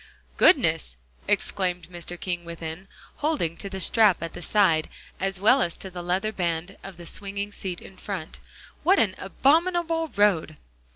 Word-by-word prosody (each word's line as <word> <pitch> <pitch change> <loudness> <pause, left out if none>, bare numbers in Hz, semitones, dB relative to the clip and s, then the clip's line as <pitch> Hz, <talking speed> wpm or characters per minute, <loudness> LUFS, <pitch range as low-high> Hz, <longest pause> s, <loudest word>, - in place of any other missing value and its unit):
"Goodness!" - - +4 0.3
exclaimed 180 -3 0
Mr. 175 0 -7
King 175 -2 -3
within, 170 +2 -7 0.3
holding 295 - 0
to 200 - -4
the 190 0 -5
strap 200 -1 +4
at 165 - -5
the - - -8
side, 170 -4 +3 0.3
as 195 0 -2
well 225 +7 +5
as 170 - 0
to 190 - -6
the 175 -1 -6
leather 185 +5 -1
band 175 -1 -2
of 195 -3 -9
the 175 - -10
swinging 200 +2 -4
seat 185 -3 -5
in 190 - -14
front. 180 -5 -6 0.4
"What 385 +3 +4
an 200 - +3
abominable 325 - +2
road!" 195 - +1
190 Hz, 160 wpm, -25 LUFS, 170-210 Hz, 0.4 s, well